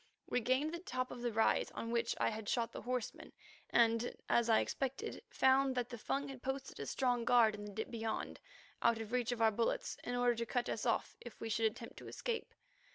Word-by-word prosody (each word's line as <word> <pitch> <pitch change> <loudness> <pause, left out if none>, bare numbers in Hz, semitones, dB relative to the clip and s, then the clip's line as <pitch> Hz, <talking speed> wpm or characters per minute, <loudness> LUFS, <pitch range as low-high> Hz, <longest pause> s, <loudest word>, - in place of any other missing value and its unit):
We - - +1
gained 260 +7 +1
the 340 - -3
top 255 -9 -3
of 245 - -7
the 240 -1 0
rise 220 +1 +3
on 230 - -3
which 235 0 +1
I - - +3
had 215 -2 -5
shot 235 -2 +1
the - - -7
horseman, 250 -2 -4 0.4
and, 230 0 +3
as 235 0 +3
I 220 - +6
expected, 275 - -2
found 265 0 +4
that 245 -1 -1
the 240 - -6
Fung 280 +6 -1
had 265 -2 -8
posted 265 +1 -4
a - - -4
strong 245 -3 +1
guard 235 -2 +5
in 205 0 -6
the 205 - -7
dip 220 +2 -4
beyond, 225 -1 -3 0.4
out 235 -1 +4
of 220 0 -6
reach 245 -1 +1
of 235 -2 0
our 220 - +6
bullets, 230 +2 -1
in 245 - -2
order 245 0 +3
to 235 0 -2
cut 245 0 0
us 225 - -2
off, 230 - 0
should 240 - -10
we 225 0 +1
attempt 230 +2 -7
to - - -9
escape. 465 -2 -3
240 Hz, 220 wpm, -36 LUFS, 225-255 Hz, 0.4 s, I